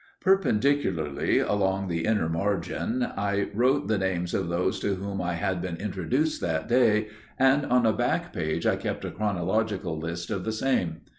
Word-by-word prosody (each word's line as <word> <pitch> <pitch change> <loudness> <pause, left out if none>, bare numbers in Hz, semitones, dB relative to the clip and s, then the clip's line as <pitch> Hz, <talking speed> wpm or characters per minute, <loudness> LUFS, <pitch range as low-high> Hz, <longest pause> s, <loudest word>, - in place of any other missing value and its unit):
Perpendicularly, 140 - +2
along 95 -1 +1
the 85 -2 -1
inner 105 -7 +2
margin, 100 +7 -1
I 100 -2 -1
wrote 130 +6 +2
the 110 -2 +1
names 90 -2 -1
of 95 -3 -1
those 90 +4 0
to 100 -1 0
whom 100 0 -4
I 90 0 -1
had 90 +2 -1
been 90 -2 -3
introduced 105 - -1
that 80 -2 -1
day, 110 -3 +3 0.3
and 135 +2 +4
on 125 -1 +3
a 110 - +4
back - - -1
page 80 0 -2
I - - +3
kept - - -4
a - - -4
chronological 100 -3 -1
list 85 +3 -5
of 100 -3 -2
the 110 - -2
same. 110 -9 0
100 Hz, 170 wpm, -27 LUFS, 85-110 Hz, 0.3 s, and